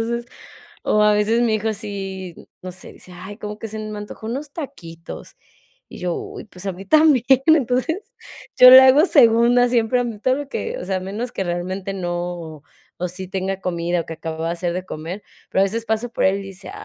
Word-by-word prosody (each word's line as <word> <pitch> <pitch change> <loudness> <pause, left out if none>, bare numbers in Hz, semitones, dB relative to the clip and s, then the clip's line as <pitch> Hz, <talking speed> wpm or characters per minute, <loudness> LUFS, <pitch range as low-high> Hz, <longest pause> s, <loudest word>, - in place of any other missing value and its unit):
entonces, 235 +1 -2 0.6
o 210 - +3
a 210 0 +5
veces 210 +3 +2
mi 230 -2 +2
hijo 220 +1 -1
sí, 195 -4 -6 0.3
no 185 - -6
sé, 185 - -11
dice: 180 - -15
"Ay, 190 +3 -9
como 210 -1 -6
que 225 - -6
se 220 - -7
me 215 -1 -6
antojo 210 +1 -9
unos 275 +5 -5
taquitos", 175 - -9 0.5
y - - -11
yo: 180 -1 -2
"Uy, - - -7
pues, 180 -3 -11
a 195 - -1
mí 185 +2 -10
también". 305 -6 +5 0.2
Entonces, 310 +1 +2 0.6
yo 255 - +10
le 260 +1 +12
hago 265 +4 +6
segunda 240 -2 +5
siempre 240 0 +2
a - - 0
mí, 230 -3 -5
todo 255 +4 +2
lo 290 -1 -6
que 465 - -4
o - - -6
sea, 190 - -1
a - - -2
menos 210 +6 -5
que - - -3
realmente 185 +2 -3
no, 175 -4 -5 0.4
o 180 - -2
sí 185 +2 -7
tenga 190 0 -3
comida 175 -1 -1
o - - -21
que 165 - -6
acababa 160 0 -5
de - - -1
hacer 175 0 -2
de 185 0 -4
comer. 170 +5 -6 0.3
Pero - - +1
a - - +5
veces 225 +4 -3
paso 220 +2 -1
por - - -3
él 190 +1 +3
y - - -7
dice: 195 0 -10
205 Hz, 220 wpm, -21 LUFS, 180-235 Hz, 0.6 s, le